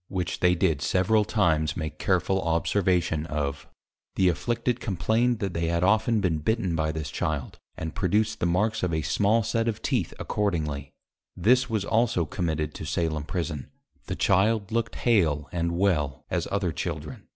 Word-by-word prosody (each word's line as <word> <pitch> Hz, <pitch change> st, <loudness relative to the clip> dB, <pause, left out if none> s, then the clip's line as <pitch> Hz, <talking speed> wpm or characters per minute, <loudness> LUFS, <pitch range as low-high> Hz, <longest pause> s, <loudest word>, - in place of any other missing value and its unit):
Which 90 Hz, -2 st, -3 dB
they 90 Hz, 0 st, +4 dB
did 80 Hz, -4 st, +1 dB
several 105 Hz, +6 st, +2 dB
times 80 Hz, -8 st, +1 dB
make 80 Hz, -3 st, -5 dB
careful 95 Hz, 0 st, +1 dB
Observation 85 Hz, -1 st, +1 dB
of: 70 Hz, -2 st, -3 dB, 0.5 s
The 95 Hz, -1 st, +4 dB
afflicted 120 Hz, +6 st, -1 dB
complained, 110 Hz, +5 st, +1 dB
they 85 Hz, -5 st, -2 dB
had 85 Hz, +1 st, 0 dB
often 110 Hz, +3 st, +3 dB
been 85 Hz, -5 st, +1 dB
Bitten 95 Hz, +1 st, 0 dB
by 80 Hz, -1 st, 0 dB
this 80 Hz, -2 st, -5 dB
Child, 70 Hz, -4 st, -3 dB, 0.2 s
and 80 Hz, 0 st, -4 dB
produced 105 Hz, +3 st, +1 dB
the 85 Hz, -, +1 dB
marks 105 Hz, +6 st, +1 dB
of 90 Hz, -, 0 dB
a 80 Hz, -, -1 dB
small 105 Hz, +9 st, +2 dB
set 115 Hz, +2 st, 0 dB
of 110 Hz, -1 st, -2 dB
teeth -, -, 0 dB
accordingly; 80 Hz, -9 st, -2 dB, 0.5 s
this 125 Hz, +4 st, +3 dB
was 110 Hz, -3 st, -1 dB
also 110 Hz, -7 st, +2 dB
committed 80 Hz, -3 st, -2 dB
to -, -, -7 dB
Salem 75 Hz, 0 st, -1 dB
Prison, 80 Hz, -6 st, -4 dB, 0.4 s
the -, -, -2 dB
Child 100 Hz, +2 st, +2 dB
looked 115 Hz, 0 st, -1 dB
hail, 80 Hz, -, +2 dB
and 85 Hz, -1 st, -1 dB
well 75 Hz, -8 st, 0 dB
as -, -, -1 dB
other 100 Hz, -4 st, 0 dB
Children. 75 Hz, -3 st, -5 dB
90 Hz, 165 wpm, -26 LUFS, 80-105 Hz, 0.5 s, they